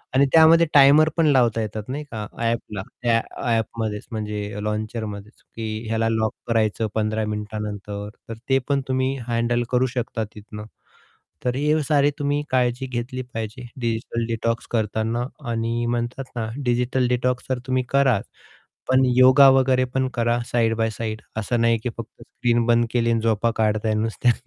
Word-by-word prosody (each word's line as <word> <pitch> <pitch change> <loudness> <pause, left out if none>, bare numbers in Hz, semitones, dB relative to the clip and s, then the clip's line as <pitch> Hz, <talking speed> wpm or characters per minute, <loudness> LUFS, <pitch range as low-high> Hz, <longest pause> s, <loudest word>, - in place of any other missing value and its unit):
आणि 140 +1 +5
त्यामध्ये 165 +1 +7
टायमर 145 +3 +7
पण 165 - +3
लावता 120 -5 +3
येतात 110 0 -4
नाही 145 +3 -3
का. 105 -2 -4
ॲपला 115 -4 -2 0.2
त्या 115 -1 +2 0.3
ॲपमध्येच 110 -2 -2
म्हणजे 105 -1 -4
लॉन्चरमध्येच 105 0 -5
की 110 0 -5
ह्याला 115 0 0
लॉक 110 -1 0
करायचं 110 -1 +1
15 110 0 0
मिनिटानंतर, 105 -1 -5 0.2
तर - - -3 0.2
ते 135 0 +4
पण 140 -1 +1
तुम्ही 130 +1 0
हँडल 120 +1 0
करू 125 +1 +3
शकता 120 -2 -2
तिथनं. 105 0 -9 0.8
तर 125 0 0
हे 150 +2 +2
सारी 145 -1 +3
तुम्ही 145 0 0
काळजी 125 0 +1
घेतली 130 +1 -4
पाहिजे 115 +2 -5
डिजिटल 115 0 -2
डिटॉक्स 115 0 -2
करताना 110 +1 -1 0.3
आणि 115 +1 -1
म्हणतात 120 +2 -2
ना 110 -1 -2 0.2
डिजिटल 125 +1 +1
डिटॉक्स 125 0 0
जर 130 - +1
तुम्ही 130 0 +1
कराच, 135 -7 +2 0.6
पण 130 0 +4
योगा 130 +2 +8
वगैरे 130 -1 +3
पण 130 -1 +1
करा 120 0 +1
साइड 115 -2 +2
बाय 110 -1 +1
साइड 110 0 -5
असं 115 +2 -1
नाही, 115 -1 +3
की 125 - -2
फक्त 115 +1 -9
स्क्रीन 120 -1 0
बंद 120 0 +3
केली 115 -1 +1
आणि 115 - +1
झोपा 115 +1 +1
काढताय 110 0 +1
नुसत्या. 115 +2 +1
115 Hz, 155 wpm, -23 LUFS, 110-130 Hz, 0.8 s, योगा